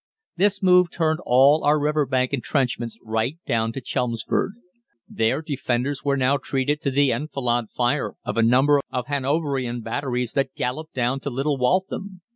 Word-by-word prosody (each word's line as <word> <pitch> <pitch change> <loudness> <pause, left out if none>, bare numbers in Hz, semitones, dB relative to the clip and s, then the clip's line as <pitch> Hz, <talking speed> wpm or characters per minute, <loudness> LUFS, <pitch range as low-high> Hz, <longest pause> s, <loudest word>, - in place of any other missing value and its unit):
This 200 +2 +1
move 180 -1 +5
turned 160 -2 0
all 135 +5 +5
our 150 +1 +3
river 150 -1 +1
bank 130 0 0
entrenchments 125 -3 -1
right 110 +6 -1
down 115 -1 0
to 135 - -5
Chelmsford. 120 - -1 0.5
Their 115 +7 0
defenders 135 -2 -2
were 140 -1 +1
now 135 +2 +2
treated 140 +2 -1
to 140 - 0
the 140 0 +3
enfilade 120 -3 -1
fire 125 +4 -1
of - - -3
a 115 - +2
number 135 +5 +4
of 125 -2 -3
Hanoverian 135 -3 -1
batteries 125 0 -3
that 135 -1 -1
galloped 155 +6 -4
down 125 +1 0
to 140 - -4
Little 135 +2 -1
Waltham. 185 +6 -1
135 Hz, 160 wpm, -23 LUFS, 125-150 Hz, 0.5 s, move